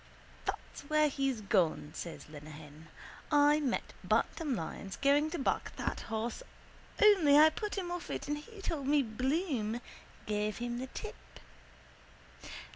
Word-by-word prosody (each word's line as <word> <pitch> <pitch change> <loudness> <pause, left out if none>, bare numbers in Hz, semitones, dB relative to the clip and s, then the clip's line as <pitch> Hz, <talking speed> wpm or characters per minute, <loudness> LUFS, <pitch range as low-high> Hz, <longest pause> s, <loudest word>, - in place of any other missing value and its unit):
—That's - - -5
where 305 0 +4
he's 270 -4 -1
gone, 180 -7 +1
says 170 - -7
Lenehan. 150 +1 -11 0.4
I 295 0 +5
met 270 -5 -1
Bantam 300 -7 +1
Lyons 190 +2 -5
going 285 +2 +3
to 345 - -3
back 270 - -1
that - - -2
horse 225 - -3 0.6
only 375 -9 +7
I 310 +1 +8
put 420 +5 -4
him 360 -3 -2
off 355 -1 -5
it - - -4
and 295 0 -1
he 400 +6 -12
told 290 -7 -2
me 290 -1 +4
Bloom 255 - -1 0.5
gave 210 0 -1
him 240 0 -3
the 260 - -4
tip. - - -9
270 Hz, 140 wpm, -33 LUFS, 215-305 Hz, 0.6 s, I